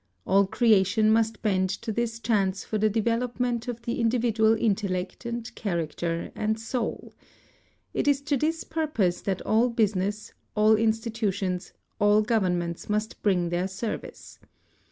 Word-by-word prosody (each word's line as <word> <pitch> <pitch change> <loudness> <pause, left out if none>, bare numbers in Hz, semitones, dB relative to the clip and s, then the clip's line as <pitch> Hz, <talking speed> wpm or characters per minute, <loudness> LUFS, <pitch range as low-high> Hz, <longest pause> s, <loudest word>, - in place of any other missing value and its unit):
All 195 0 +4
creation 215 -1 +3
must 225 0 +1
bend 190 -3 +2
to 220 +4 -4
this 230 +1 -2
chance 200 -5 0
for 215 - -2
the 215 +1 +3
development 235 +2 -1
of 235 -1 -5
the 235 +3 -2
individual 225 -1 +3
intellect 195 -2 -1
and 235 -1 -5
character 170 -3 -3
and 220 +1 -1
soul. 225 +1 -4 0.8
It - - -1
is 285 -1 +4
to 290 0 0
this 315 +4 0
purpose 300 - -1
that 190 -2 -2
all 230 +3 +3
business, 210 -2 -1 0.2
all 215 +1 +5
institutions, 215 -4 -1 0.3
all 205 +1 +4
governments 180 -7 -1
must 210 +1 -2
bring 180 -4 +2
their 175 +2 0
service. 195 +3 -6
215 Hz, 135 wpm, -26 LUFS, 190-230 Hz, 0.8 s, all